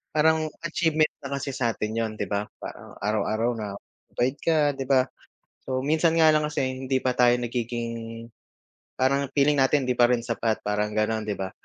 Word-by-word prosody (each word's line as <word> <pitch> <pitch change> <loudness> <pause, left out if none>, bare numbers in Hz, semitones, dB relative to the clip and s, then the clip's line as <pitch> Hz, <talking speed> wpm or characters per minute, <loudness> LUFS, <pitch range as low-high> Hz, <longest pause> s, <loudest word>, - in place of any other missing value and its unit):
Parang 155 0 +3 0.2
achievement 155 -2 +1
na 140 0 -3
kasi 140 0 -4
sa'tin 115 -4 -1
'yun 110 -1 -2
'di - - -2
ba? 100 0 0 0.2
Parang - - -9
araw-araw 110 +3 0
napagod 110 +6 -4
ka 155 -3 +3
'di 135 -1 -4
ba? 130 -2 +5 0.6
So 130 -1 -1
minsan 160 +2 +3
nga 160 - +7
lang 150 - +2
kasi 150 -2 -2
hindi 130 0 -1
pa 130 - +1
tayo 120 0 +5
nagiging 115 -1 -4 0.7
parang 140 +2 +2
feeling 145 +1 +4
natin 135 +1 +3
hindi 125 - +1
parin 120 -1 +4
sapat, 115 -2 -1
parang 105 0 0
ganon 110 0 0
'di 105 - -1
ba? 95 -1 -4
125 Hz, 170 wpm, -26 LUFS, 115-140 Hz, 0.7 s, nga